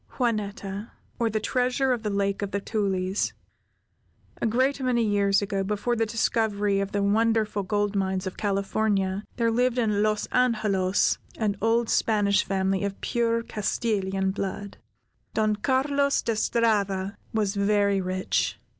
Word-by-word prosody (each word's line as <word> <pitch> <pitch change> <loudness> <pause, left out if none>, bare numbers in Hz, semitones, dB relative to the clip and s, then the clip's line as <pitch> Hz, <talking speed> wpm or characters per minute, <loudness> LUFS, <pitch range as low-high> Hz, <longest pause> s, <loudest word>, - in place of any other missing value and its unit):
JUANETTA; 210 -3 -2 0.3
OR, 230 -1 +2
THE 215 0 -1
TREASURE 255 +4 +1
OF 240 - -3
THE 215 - -2
LAKE 200 0 -1
OF 200 - -2
THE 200 - -2
TULIES 195 -2 -1 1.1
A - - +2
great 260 +5 +1
many 250 -2 +2
years 200 -1 +2
ago, 195 -1 -1
before 210 +4 -1
the 225 -1 0
discovery 210 -2 +1
of 195 0 -2
the 205 -1 0
wonderful 215 0 +2
gold 205 +1 -1
mines 190 -1 -1
of 185 - -4
California, 200 -1 0
there 230 -1 +1
lived 245 +2 +1
in 210 -4 +1
Los 215 0 +1
Angelos 210 -6 +2 0.2
an 210 -3 0
old 230 +2 +2
Spanish 205 -3 +2
family 190 0 0
of 200 -1 -3
pure 230 -1 0
Castilian 195 -3 -1
blood. 200 +1 -5 0.6
Don 215 -1 +2
Carlos 280 +4 +1
De 230 - 0
Strada 205 -4 +1 0.2
was 210 -3 0
very 200 -1 +2
rich. 185 0 -1
210 Hz, 145 wpm, -26 LUFS, 195-230 Hz, 1.1 s, OR